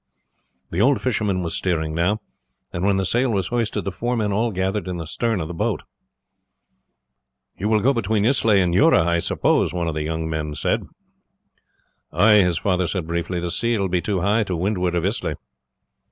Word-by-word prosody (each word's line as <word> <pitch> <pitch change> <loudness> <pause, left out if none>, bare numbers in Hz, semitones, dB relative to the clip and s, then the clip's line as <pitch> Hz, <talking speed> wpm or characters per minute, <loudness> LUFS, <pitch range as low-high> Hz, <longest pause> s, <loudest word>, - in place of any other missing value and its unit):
The 85 - 0
old 135 +4 +4
fisherman 105 -7 -1
was 85 0 -2
steering 80 -4 -1
now, 90 +6 0 0.5
and 85 - -3
when 100 0 +2
the 95 - 0
sail 120 +5 +1
was 95 -4 -1
hoisted 115 -5 -1
the 100 - -2
four 120 +6 -2
men 105 -2 0
all 110 +4 0
gathered 95 +1 -2
in 90 -1 -3
the 85 - -5
stern 115 +6 -1
of 80 - -3
the 85 - -6
boat. 80 - -2 1.7
"You 105 +3 -2
will 110 -1 +3
go 135 +3 +4
between 110 -3 0
Islay 115 -5 +3
and 90 -2 +1
Jura, 90 -2 +5
I 85 0 +2
suppose," 85 - +1
one 85 -1 -1
of 80 - -1
the 75 - -3
younger 80 +1 -3
men 80 -2 -3
said. - - -1 1.2
"Ay," 105 0 +5
his 90 -3 +1
father 90 -2 0
said 90 -3 -2
briefly; 85 +2 -2
"the 85 0 -3
sea 115 +3 0
will 100 -2 -1
be 90 0 0
too 95 -2 -1
high 105 +4 +2
to 95 - -2
windward 90 0 -1
of 85 0 0
Islay." 105 +5 -1
95 Hz, 195 wpm, -22 LUFS, 85-110 Hz, 1.7 s, Jura